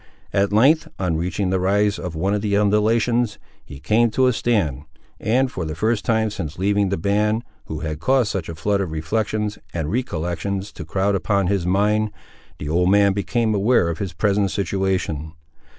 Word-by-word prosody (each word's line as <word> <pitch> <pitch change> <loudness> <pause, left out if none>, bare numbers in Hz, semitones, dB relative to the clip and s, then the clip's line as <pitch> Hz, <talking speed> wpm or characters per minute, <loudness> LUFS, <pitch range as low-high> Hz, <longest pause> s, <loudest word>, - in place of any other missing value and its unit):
At 100 0 +2
length, 135 +10 +4
on 90 -4 -1
reaching 90 +3 -1
the 95 - +1
rise 100 +2 +1
of 90 -3 -5
one 95 +5 0
of 105 - 0
the 100 -1 +1
undulations, 110 +3 +2 0.3
he 70 -3 -11
came 110 - +2
to 130 +4 +2
a 125 - +3
stand; 85 - 0 0.3
and, 130 +4 +1
for 90 - -4
the 80 -1 -4
first 110 +2 0
time 110 -1 +1
since 80 -7 -5
leaving 100 +1 +1
the 100 - -1
band, 105 +5 +1 0.2
who 80 -1 -6
had 75 -1 -4
caused 130 +1 +2
such 90 -5 -4
a 85 - -5
flood 100 +6 0
of 95 - -2
reflections 105 +6 -2 0.2
and 80 -1 -2
recollections 100 -2 -2
to - - -9
crowd 100 +1 0
upon 100 +1 +1
his 90 -1 0
mind, 105 +3 +2 0.5
the 75 - -6
old 90 +4 +2
man 100 0 +4
became 110 +3 0
aware 100 -3 +3
of 85 - -4
his 95 -4 -4
present 100 +3 +1
situation. 95 -6 -2
100 Hz, 185 wpm, -22 LUFS, 90-105 Hz, 0.5 s, length